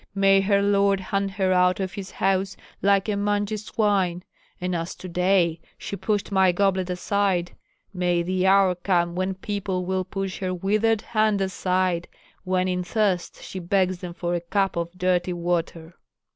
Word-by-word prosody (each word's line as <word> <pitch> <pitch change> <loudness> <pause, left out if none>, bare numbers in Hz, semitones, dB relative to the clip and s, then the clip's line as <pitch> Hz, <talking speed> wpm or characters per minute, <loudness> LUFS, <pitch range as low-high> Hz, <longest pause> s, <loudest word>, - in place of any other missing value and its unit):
May 195 0 +5
her 200 0 +2
lord 200 -1 +3
hunt 195 +1 -1
her 190 -2 +1
out 180 +1 +3
of 190 -2 -3
his 195 -2 -6
house 195 0 0 0.2
like 200 0 +3
a 210 - 0
mangy 205 +1 0
swine! 200 -4 0 0.4
And 180 0 -2
as 165 0 -3
to 185 - -9
day 180 -2 +1 0.2
she - - -5
pushed 205 0 -2
my 190 -2 +4
goblet 190 0 +1
aside, 180 -1 0 0.4
may 175 -2 +1
the 185 +1 0
hour 195 -1 +5
come 175 -1 0
when 185 +1 -2
people 190 -2 -3
will 185 0 -1
push 195 0 -4
her 185 -1 -2
withered 215 +4 +1
hand 215 -2 +1
aside, 185 -2 0 0.4
when 185 0 0
in 180 -1 -1
thirst 190 -1 -1
she 190 - -6
begs 185 0 +1
them 175 -2 -7
for 175 0 -2
a 175 - -1
cup 195 +3 0
of 170 0 -2
dirty 180 0 +1
water." 170 -1 -2
185 Hz, 170 wpm, -24 LUFS, 180-200 Hz, 0.4 s, May